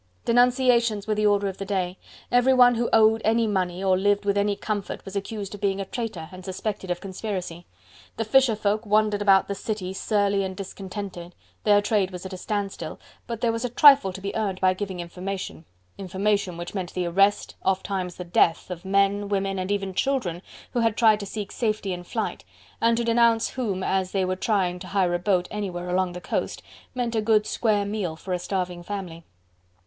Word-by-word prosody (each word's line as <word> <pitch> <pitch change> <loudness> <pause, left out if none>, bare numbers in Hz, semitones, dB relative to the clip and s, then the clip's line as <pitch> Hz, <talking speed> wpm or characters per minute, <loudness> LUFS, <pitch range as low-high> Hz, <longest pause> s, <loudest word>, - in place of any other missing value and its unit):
Denunciations 245 -3 +3
were 215 - 0
the 210 0 +2
order 205 -1 +2
of 190 - -5
the - - -3
day. 190 -2 -2 0.3
Everyone 245 0 +6
who 235 0 0
owned 220 0 +5
any 225 +1 +3
money, 185 -3 -1
or 190 -1 +4
lived 205 +2 +1
with 200 0 +2
any 205 0 +1
comfort 205 -1 -4
was 195 0 -8
accused 200 0 -4
of 205 - -9
being 200 -1 0
a 195 - -2
traitor 200 -7 -5
and 185 0 -10
suspected 190 +1 -4
of 175 0 -1
conspiracy. 185 -3 -5 0.5
The 225 - -1
fisher 250 0 +4
folk 210 +1 0
wandered 210 -1 +2
about 195 -2 +5
the 200 - -2
city, 195 -2 -4
surly 200 -1 +1
and 190 -1 -5
discontented: 190 -2 -7 0.3
their 205 -1 +5
trade 205 -3 +1
was 180 0 -8
at 190 - -6
a - - -5
standstill, 195 -5 -4 0.3
but 230 -1 -5
there 235 - +2
was 230 +1 -3
a 250 - -1
trifle 275 -4 +7
to 190 +1 -9
be 200 +1 -4
earned 200 -4 -1
by 185 -1 +3
giving 190 -1 -5
information: 180 0 -6 0.3
information 195 -1 -1
which 175 0 -6
meant 185 -3 -4
the 180 -1 -1
arrest, 195 +4 +2
ofttimes 190 -1 -1
the 180 - -6
death 175 0 +2
of 175 0 -6
men, 200 +1 +1
women 195 -1 -1
and 185 +1 -3
even 200 -2 -1
children 185 -7 -1 0.3
who 245 - -1
had 225 -2 +1
tried 220 -3 +5
to 200 - -6
seek 205 0 -5
safety 215 -4 -1
in 175 0 -6
flight, - - -4 0.4
and 230 0 +3
to 235 - 0
denounce 230 -1 +3
whom 205 -8 -2
as 190 -1 0
they 190 -2 +1
were 185 0 -1
trying 185 -3 0
to 185 - -9
hire 190 -3 +1
a 175 - 0
boat 180 -1 +1
anywhere 180 -4 -4
along 185 0 +1
the 180 - -6
coast - - -3 0.3
meant 240 -2 -1
a 220 - +2
good 215 -1 +3
square 210 -3 +1
meal 200 -6 -3
for 185 +3 -5
a 180 - -1
starving 180 -1 -3
family. 175 -3 -6
200 Hz, 205 wpm, -25 LUFS, 185-215 Hz, 0.5 s, trifle